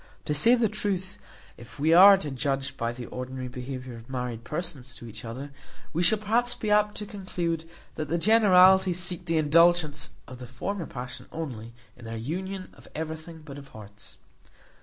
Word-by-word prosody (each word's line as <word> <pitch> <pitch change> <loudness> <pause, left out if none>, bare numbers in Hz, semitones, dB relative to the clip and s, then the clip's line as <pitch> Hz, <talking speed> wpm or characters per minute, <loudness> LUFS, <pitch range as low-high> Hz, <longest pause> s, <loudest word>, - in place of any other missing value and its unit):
To 150 - 0
say 230 - +7
the 235 -2 +2
truth, 190 -3 -1 0.4
if 120 - -11
we 155 +3 +3
are 195 +3 +9
to 150 -6 -5
judge 135 0 -2
by 115 -3 -2
the 120 0 -8
ordinary 130 +1 -6
behaviour 125 0 -7
of 115 +2 -14
married 125 -3 -4
persons 150 -5 -5
to 120 - -10
each 110 - -9
other, 130 +5 -7 0.4
we 165 - 0
shall 180 +5 +4
perhaps 230 +4 0
be 215 - -3
apt 210 0 +3
to 210 - -5
conclude 175 -6 -4 0.2
that 155 - -4
the 165 +4 0
generality 190 -2 +6
seek 175 0 -1
the 165 -1 0
indulgence 160 0 +3 0.2
of 130 -1 -10
the 125 - -8
former 170 +9 -4
passion 125 0 -8
only, 120 -8 -6 0.2
in 115 - -13
their 115 0 -5
union 185 +10 -5
of - - -18
everything 160 +1 -6
but 140 -2 -9
of 140 - -13
hearts. 105 -3 -12
155 Hz, 180 wpm, -27 LUFS, 125-185 Hz, 0.4 s, are